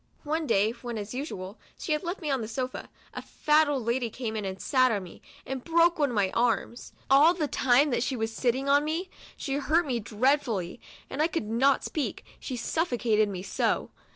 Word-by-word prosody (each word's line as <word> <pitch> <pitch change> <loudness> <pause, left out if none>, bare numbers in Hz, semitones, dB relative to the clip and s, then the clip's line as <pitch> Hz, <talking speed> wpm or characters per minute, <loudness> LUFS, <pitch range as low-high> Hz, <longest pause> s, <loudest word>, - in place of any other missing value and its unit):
One 315 +1 -2
day, 210 -1 +3
when, 240 -1 -6
as 210 +1 -6
usual, 215 -8 -6 0.2
she 335 - -5
had 300 - +1
left 360 +2 -4
me 305 -3 -2
on 265 -3 0
the 220 - -4
sofa, 255 +3 -4 0.2
a - - -5
fat 305 +1 +2
old 270 -5 -1
lady 235 0 0
came 225 -1 -5
in 210 -2 -3
and 190 0 -5
sat 255 -2 +3
on 205 -3 -1
me, 175 - -12 0.2
and 265 -1 -5
broke 335 0 +3
one 290 -2 +3
of 240 - -4
my 195 -2 +2
arms. 235 0 -1 0.2
All 295 +6 +6
the 310 -4 -1
time 265 +2 +3
that 240 - +1
she 255 +1 -1
"v^as 225 0 -1
sitting 255 +4 -1
on 285 +1 +4
me, 330 +5 -3 0.3
she 275 0 -2
hurt 315 +5 +2
me 250 -4 -1
dreadfully, 230 -3 0 0.3
and 290 - -3
I 315 - +4
could 330 -10 -3
not 260 +5 +2
speak, 305 - -3
she 260 - -5
suffocated 235 -6 +1
me 185 -2 -5
so. - - -1
255 Hz, 210 wpm, -28 LUFS, 225-295 Hz, 0.3 s, All